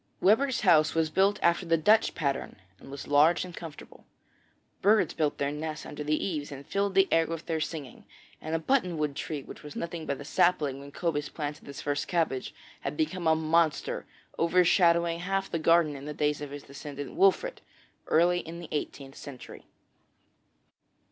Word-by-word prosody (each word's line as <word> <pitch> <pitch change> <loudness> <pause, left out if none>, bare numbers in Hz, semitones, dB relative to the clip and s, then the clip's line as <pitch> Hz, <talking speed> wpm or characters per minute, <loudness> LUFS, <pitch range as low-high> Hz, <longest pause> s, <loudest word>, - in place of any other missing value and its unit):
Webber's 240 +8 +3
house 160 -7 +4
was 160 -1 +1
built 195 +5 +3
after 170 +2 +3
the 165 -1 +2
Dutch 215 +8 +3
pattern, 140 -3 -2 0.2
and - - -13
was 140 0 -8
large 150 +5 +4
and 180 -2 -10
comfortable. 165 -3 -11 0.7
Birds 210 +2 +4
built 150 -3 0
their 140 0 -1
nests 155 +1 -5
under 150 - -6
the 150 +1 +1
eaves 150 -7 -3
and 140 0 -8
filled 200 +2 -1
the 195 0 +5
air 165 0 +4
with 165 -1 -5
their 165 -2 -1
singing, 150 -4 -6 0.4
and 160 +1 -3
a - - +3
button 180 -2 +1
wood 150 -2 -1
tree, 150 -2 -4
which - - -11
was 150 -1 -10
nothing 170 -1 -5
but 140 - -2
a 145 - -8
sapling 150 -4 +2
when 140 0 -11
Cobus 150 -2 -2
planted 150 -1 -6
his 140 -1 -7
first 145 0 -1
cabbage, 160 -7 -1 0.3
had - - -5
become 185 - -1
a 160 - +5
monster 160 0 +1 0.3
overshadowing 170 -1 +3
half 195 +2 -2
the 165 - -1
garden 165 -2 +3
in 140 0 -8
the 150 0 -6
days 150 0 0
of 145 - -5
his 145 0 -8
descendant 140 0 -8
Wolfert 390 +8 +2 0.5
early 175 +2 +3
in 165 0 -8
the 170 - -9
eighteenth 140 -2 -4
century. 140 -4 -10
160 Hz, 180 wpm, -28 LUFS, 145-175 Hz, 0.7 s, the